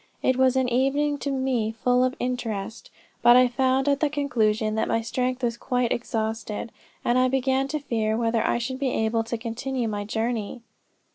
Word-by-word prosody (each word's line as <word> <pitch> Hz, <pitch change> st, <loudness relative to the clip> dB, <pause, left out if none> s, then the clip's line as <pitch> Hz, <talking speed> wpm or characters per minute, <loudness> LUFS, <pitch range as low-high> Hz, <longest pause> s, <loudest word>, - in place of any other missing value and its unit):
It 260 Hz, -, +3 dB
was 260 Hz, 0 st, +3 dB
an 260 Hz, -1 st, +2 dB
evening 275 Hz, +4 st, +1 dB
to 285 Hz, -, -3 dB
me 260 Hz, -5 st, 0 dB
full 250 Hz, +2 st, +2 dB
of 255 Hz, 0 st, 0 dB
interest; 230 Hz, -4 st, -4 dB, 0.3 s
but 240 Hz, +1 st, +7 dB
I 250 Hz, 0 st, +6 dB
found 260 Hz, +2 st, +1 dB
at 280 Hz, -1 st, +2 dB
the 300 Hz, -, +2 dB
conclusion, 225 Hz, -7 st, 0 dB
that 220 Hz, -, 0 dB
my 225 Hz, -, +1 dB
strength 255 Hz, +2 st, -2 dB
was 235 Hz, -1 st, 0 dB
quite 245 Hz, 0 st, -1 dB
exhausted, 220 Hz, -1 st, -3 dB, 0.3 s
and 245 Hz, +1 st, +3 dB
I 255 Hz, -, +4 dB
began 265 Hz, +1 st, +1 dB
to 305 Hz, +2 st, -2 dB
fear 225 Hz, -5 st, -1 dB
whether 230 Hz, -1 st, +1 dB
I -, -, +1 dB
should 260 Hz, +2 st, -4 dB
be 275 Hz, -2 st, 0 dB
able 225 Hz, -1 st, 0 dB
to 230 Hz, +1 st, -4 dB
continue 240 Hz, +2 st, -3 dB
my 205 Hz, -1 st, -3 dB
journey." 225 Hz, +1 st, -3 dB
245 Hz, 190 wpm, -25 LUFS, 225-260 Hz, 0.3 s, but